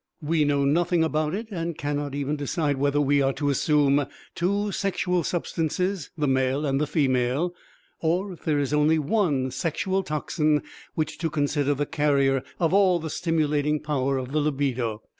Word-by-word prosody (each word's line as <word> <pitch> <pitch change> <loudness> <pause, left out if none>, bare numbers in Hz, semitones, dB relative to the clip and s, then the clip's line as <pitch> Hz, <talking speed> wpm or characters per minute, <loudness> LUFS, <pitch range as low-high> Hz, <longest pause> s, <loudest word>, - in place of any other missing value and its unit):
We 155 0 +2
know 140 -1 +2
nothing 170 +3 +2
about 155 +1 0
it 220 +2 -5
and 170 -3 -3
cannot 145 -1 -3
even 145 +1 -1
decide 145 0 -1
whether 145 +1 +1
we 145 0 +3
are 135 0 +2
to 145 0 0
assume 145 0 +2 0.3
two 200 +4 0
sexual 180 -3 0
substances, 175 +1 -2
the 150 - 0
male 130 +2 +1
and 135 0 0
the 150 - +1
female, 135 +3 +1 0.5
or, 180 +4 0
if 175 - -15
there 155 -2 +1
is 145 0 -1
only 150 +2 +4
one 150 -5 +1
sexual 170 +8 -1
toxin, 150 -1 0 0.3
which 155 -1 -2
to 165 -1 -1
consider 145 -1 0
the 145 +2 -1
carrier 140 -2 +2 0.2
of 165 0 +1
all 190 -3 +5
the 160 -2 -5
stimulating 150 -3 0
power 140 -3 -1
of 130 0 -4
the 155 - +1
libido. 130 -7 -1
150 Hz, 170 wpm, -25 LUFS, 140-165 Hz, 0.5 s, all